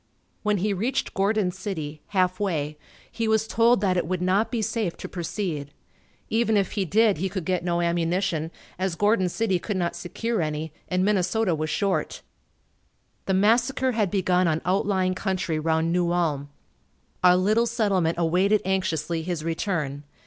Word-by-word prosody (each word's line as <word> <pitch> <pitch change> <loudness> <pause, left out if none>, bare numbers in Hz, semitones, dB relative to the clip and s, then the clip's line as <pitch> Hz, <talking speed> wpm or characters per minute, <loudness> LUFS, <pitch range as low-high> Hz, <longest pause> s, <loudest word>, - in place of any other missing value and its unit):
When 210 -1 +1
he 200 +2 0
reached 225 +8 -1
Gordon 200 -1 +1
City, 160 -6 -5
half 185 -2 +1
way, 155 -7 -1 0.4
he 230 -1 -2
was 220 0 +2
told 230 -1 +3
that 185 -3 +2
it 175 - 0
would 185 +1 -1
not 185 +5 +2
be 230 -3 -1
safe 210 -4 -2
to - - -6
proceed. 170 -4 -4 0.6
Even 225 -1 +2
if 195 -2 +1
he 200 -3 -1
did 210 0 +3
he 190 +2 -1
could 190 -3 -4
get 180 -1 0
no 175 -1 0
ammunition, 170 -1 0 0.3
as 185 -2 -1
Gordon 205 -1 +2
City 190 -2 0
could 205 +2 -3
not 175 -2 -1
secure 215 +5 -2
any 155 0 -3
and 185 0 +1
Minnesota 205 0 +1
was 155 0 -2
short. 195 +3 -1 1.0
The 190 - +2
massacre 240 +6 +3
had 215 -5 +1
begun 185 -2 +2
on 160 -1 +1
outlying 185 0 +1
country 185 -4 -2
round 160 +1 +1
New 175 -1 +1
Ulm. 150 -5 0 0.7
Our 180 0 +7
little 215 +5 +2
settlement 200 -8 +1
awaited 185 +5 +2
anxiously 170 -4 -1
his 170 -2 -3
return. 160 -4 -2
185 Hz, 165 wpm, -25 LUFS, 170-205 Hz, 1.0 s, Our